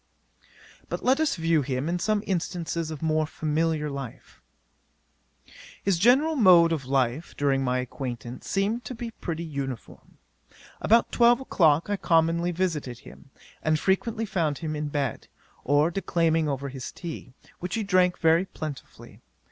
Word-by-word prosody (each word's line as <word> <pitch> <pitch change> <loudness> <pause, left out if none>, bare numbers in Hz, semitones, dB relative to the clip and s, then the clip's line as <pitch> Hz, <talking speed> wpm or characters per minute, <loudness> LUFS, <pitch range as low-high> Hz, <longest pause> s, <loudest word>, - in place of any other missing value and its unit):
'But - - -4
let 265 +3 +4
us 315 -1 +1
view 165 -2 +2
him 130 +1 -2
in 175 +1 -1
some 210 +3 0
instances 170 -3 -2
of 155 0 -7
more 155 -1 +1
familiar 155 0 -1
life. 140 -4 -8 1.4
'His 190 -4 +1
general 270 - +4
mode 180 - +6
of 150 -5 -2
life, 135 +3 -1
during 135 -2 +1
my 125 -1 0
acquaintance, 125 -2 -6
seemed 210 +5 0
to 255 - -6
be 230 0 -6
pretty 170 -6 -5
uniform. 140 -6 -7 0.6
About 230 +2 +3
twelve 240 0 +5
o'clock 165 - +2
I 205 0 -1
commonly 165 0 +2
visited 160 -9 -2
him, - - -15 0.3
and 155 0 +2
frequently 220 +6 0
found 165 -8 -1
him 155 -2 -4
in 150 0 -3
bed, 140 -4 -3 0.4
or 145 +4 +3
declaiming 165 -4 +1
over 140 0 -3
his 130 -1 -7
tea, 160 -7 -8 0.2
which 180 0 -4
he 225 - -1
drank 185 -2 +3
very 165 +3 +3
plentifully. 155 -6 -9
165 Hz, 150 wpm, -26 LUFS, 145-190 Hz, 1.4 s, mode